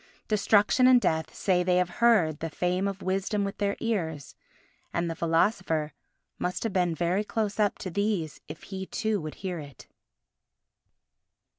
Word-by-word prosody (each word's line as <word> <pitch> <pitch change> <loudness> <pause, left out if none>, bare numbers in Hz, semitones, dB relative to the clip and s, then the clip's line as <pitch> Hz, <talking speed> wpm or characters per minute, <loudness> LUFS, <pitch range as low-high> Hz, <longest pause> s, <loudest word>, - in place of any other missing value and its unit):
Destruction 210 +4 +4
and 255 -1 +7
Death 160 -8 0
say 185 -2 +1
they 180 0 +2
have 180 -1 +2
heard 185 -11 +4
the 165 - -3
fame 180 +4 0
of 195 -1 -5
Wisdom 195 +2 0
with 200 0 -4
their 200 -1 0
ears, 165 - -2 0.6
and 170 0 -1
the - - -5
philosopher 165 -2 +1 0.5
must 180 0 -2
have 225 -4 -2
been 180 -3 +1 0.3
close 210 -1 -2
up 205 -1 +2
to 185 - -6
these 200 -5 -1
if 150 +1 -9
he 190 -1 -6
too 215 -3 -1
would 155 -1 -6
hear 185 -3 -4
it. 145 -2 -11
185 Hz, 155 wpm, -28 LUFS, 165-205 Hz, 0.6 s, and